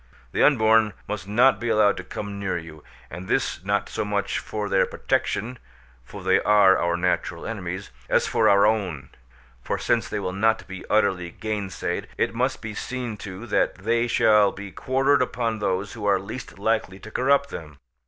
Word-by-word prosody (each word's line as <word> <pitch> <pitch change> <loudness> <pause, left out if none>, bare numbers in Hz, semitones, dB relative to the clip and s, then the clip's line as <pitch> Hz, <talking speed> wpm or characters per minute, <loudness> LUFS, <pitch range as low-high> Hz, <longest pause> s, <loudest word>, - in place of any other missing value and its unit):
The - - 0
unborn 110 -5 +4
must 105 -3 -5
not 120 +6 +4
be 120 - -2
allowed 105 -2 +4
to 95 - -5
come 100 +2 -6
near 95 -3 -1
you: 80 -2 -10 0.3
and 90 +3 -7
this - - -1
not 100 +1 0
so - - -3
much 100 -1 -1
for 105 -1 -4
their 95 -1 +2
protection 120 +3 -2 0.4
(for - - -10
they - - +4
are 105 -2 +5
our 85 0 0
natural 90 +1 -1
enemies), - - -5 0.2
as - - +3
for - - +3
our 100 0 +5
own; 100 -9 -1 0.5
for - - -2
since 110 -5 0
they - - -3
will 90 -2 -3
not 110 +3 +1
be 95 -1 -8
utterly 95 -5 +2
gainsaid, 105 0 -4
it - - 0
must 125 +3 -1
be 110 0 -5
seen 125 +1 -4
to 100 +2 -8
that 115 - +1
they 115 +5 0
shall 105 -3 +4
be 100 0 -9
quartered 135 +6 +2
upon 115 -3 -1
those 95 0 -1
who 105 -2 -4
are 100 -1 +4
least 100 +5 -8
likely 105 -2 -1
to 110 +3 -12
corrupt 140 +3 +2
them. 75 -3 -8
105 Hz, 185 wpm, -24 LUFS, 95-115 Hz, 0.5 s, are